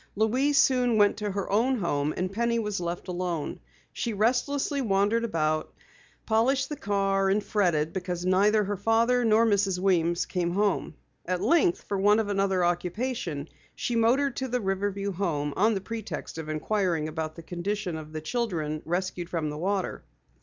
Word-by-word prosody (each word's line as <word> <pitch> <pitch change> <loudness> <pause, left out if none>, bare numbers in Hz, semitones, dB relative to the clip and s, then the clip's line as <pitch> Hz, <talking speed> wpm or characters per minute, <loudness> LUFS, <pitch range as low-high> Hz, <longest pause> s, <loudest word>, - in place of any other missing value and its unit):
Louise 255 +7 +2
soon 250 -4 +4
went 205 -1 +4
to 210 -1 -2
her 200 0 -3
own 240 +6 +3
home 150 -7 0
and 185 +1 -1
Penny 235 +2 +1
was 210 -4 -2
left 175 +1 -4
alone. 175 -4 -3 0.3
She 235 - -2
restlessly 260 +6 +1
wandered 210 +1 +2
about, 155 -7 -1 0.5
polished 260 +5 +2
the 300 - -3
car, 195 -3 +1
and 200 +2 +1
fretted 170 -8 +1
because 180 -2 -3
neither 205 +3 +4
her 205 0 -2
father 230 +4 +2
nor 225 0 +4
Mrs. 200 -3 +2
Weems 175 -2 +1
came 175 -2 -1
home. 200 -5 0 0.3
At 180 0 0
length, 310 - +2
for 200 - -3
want 205 +2 +4
of 215 -2 -1
another 195 -2 +1
occupation, 175 - -2 0.3
she 240 - -2
motored 245 +4 +2
to 260 - -2
the 250 0 -1
Riverview 200 0 -1
Home 155 -6 -2
on 215 +3 +3
the 195 - -2
pretext 220 -5 -6
of 155 -1 -6
inquiring 165 0 0
about 155 0 -4
the 165 - -10
condition 180 +2 -3
of 155 -1 -8
the 155 0 -5
children 160 -8 -2
rescued 175 +1 -2
from 160 -4 -2
the 150 - -6
water. 195 +2 -2
195 Hz, 170 wpm, -27 LUFS, 175-225 Hz, 0.5 s, soon